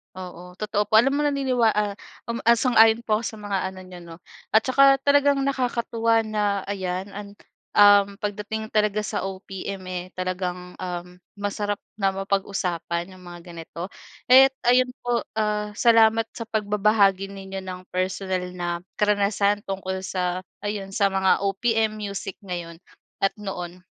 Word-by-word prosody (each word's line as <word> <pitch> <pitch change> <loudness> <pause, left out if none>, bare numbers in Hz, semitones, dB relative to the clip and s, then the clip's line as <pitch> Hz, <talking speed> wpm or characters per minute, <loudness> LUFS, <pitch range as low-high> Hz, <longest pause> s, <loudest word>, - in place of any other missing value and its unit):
Oo, 180 -1 -9
totoo 210 -1 0
po. 210 - -13
Alam 275 +3 +1
mo, - - +1
naniniwa 260 -6 +2
ah, 210 -1 0 0.4
uhm, 235 - -1 0.2
sang-ayon 225 -2 +5
po 215 -3 +1
ako 225 - -6
sa 220 +2 -5
mga 205 -1 -2
ano 190 0 -11
niyo, 185 -1 -11
'no, 170 -1 -11 0.4
at 220 - +6
tsaka 275 +2 +5
talagang 285 0 +3
nakakatuwa 235 -4 +1
na 210 -2 -1
ayan 190 -1 -3
an 205 +1 -8 0.5
uhm, 205 -1 +6
pagdating 210 +1 -4
talaga 210 -1 +1
sa 210 - -3
OPM, 195 0 -6
eh, 180 -1 -3
talagang, 180 -1 -4
uhm, 180 0 -6 0.2
masarap 205 0 -3 0.2
na 195 -2 +1
mapag-usapan 190 -3 -2
'yong 185 -1 -14
mga 175 0 -9
ganito. 170 +1 -8 0.4
Kaya't 265 +1 +8 0.2
ayun 250 0 +4
po, 240 -1 -1
ah, 210 -1 -1
salamat 225 0 +4
sa 230 - -7
pagbabahagi 210 -2 +2
ninyo 195 0 -7
ng 185 -1 -6
personal 185 0 -2
na 175 -1 -4
karanasan 205 0 +1
tungkol 190 -1 -3
sa 185 0 -2 0.2
ayon, 205 -2 -4
sa 200 -1 +3
mga 190 0 +2
OPM 215 +2 0
music 200 -2 -5
ngayon 175 -2 -6 0.4
at 195 - +1
noon. 180 -3 -7
200 Hz, 150 wpm, -24 LUFS, 185-220 Hz, 0.5 s, Kaya't